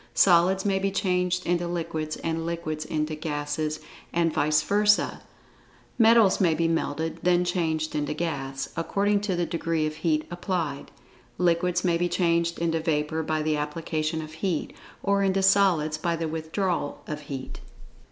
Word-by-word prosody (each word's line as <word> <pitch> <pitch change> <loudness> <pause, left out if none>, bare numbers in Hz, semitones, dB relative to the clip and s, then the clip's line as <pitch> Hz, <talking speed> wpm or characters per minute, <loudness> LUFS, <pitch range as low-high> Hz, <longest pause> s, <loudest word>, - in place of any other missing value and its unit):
Solids 185 +1 +4
may 195 -1 +2
be 195 +1 0
changed 180 -2 0
into 175 0 0
liquids, 160 -3 -3
and 165 0 -2
liquids 165 -2 -3
into 155 0 -2
gases, 150 0 -3 0.3
and 165 -2 +1
vice 150 +1 +2
versa. 210 +4 +2 0.8
Metals 225 -3 +5
may 170 -4 +3
be 165 +1 +1
melted, 160 -1 -2
then 180 0 +3
changed 160 -3 -1
into 150 0 -2
gas, 135 -5 -3
according 200 +5 +1
to 200 -3 -1
the 175 0 0
degree 165 -1 -1
of 155 0 -4
heat 155 -1 0
applied. 175 -5 -3 0.5
Liquids 175 0 +1
may 170 -2 +2
be 175 0 +1
changed 170 -1 +1
into 165 -1 0
vapor 160 0 -1
by 155 0 -1
the 155 -1 +1
application 155 +1 -2
of 155 0 -10
heat, 165 -1 -2 0.3
or 200 0 +2
into 195 0 +1
solids 180 -6 +3
by 170 +1 0
the 165 0 -2
withdrawal 160 0 -2
of 150 -1 -5
heat. 135 -2 -6
165 Hz, 155 wpm, -26 LUFS, 155-180 Hz, 0.8 s, Metals